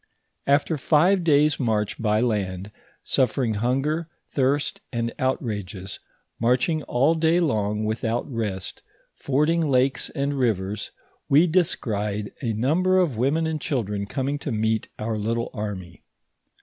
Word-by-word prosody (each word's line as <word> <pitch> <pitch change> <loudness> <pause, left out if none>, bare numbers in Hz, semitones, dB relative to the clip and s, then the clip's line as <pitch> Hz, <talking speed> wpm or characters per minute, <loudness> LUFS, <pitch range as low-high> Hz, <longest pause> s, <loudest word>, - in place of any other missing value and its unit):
After 145 +2 +2
five 175 +7 +3
days' 150 -2 +3
march 110 -5 0
by 105 -1 +2
land, 100 -4 -1 0.3
suffering 125 -2 +1
hunger, 135 +9 0 0.2
thirst, 145 +9 0
and 115 -2 -2
outrages, 105 -7 -3 0.4
marching 125 +7 +2
all 135 +6 +3
day 165 +1 +3
long 105 -9 0
without 115 +2 -1
rest, 110 -7 -4 0.3
fording 150 +5 +1
lakes 135 -3 +2
and 140 +1 -2
rivers, 105 -4 -1 0.4
we 150 +5 +6
descried 105 - 0
a 120 -4 -1
number 165 - +2
of 175 -9 +2
women 140 +8 +1
an^ 160 -1 -1
children 105 -8 -2
coming 140 +4 -2
to 145 - -4
meet 110 0 0
our 110 0 -2
little 115 +2 -1
army. 100 -6 -6
125 Hz, 125 wpm, -24 LUFS, 105-150 Hz, 0.4 s, we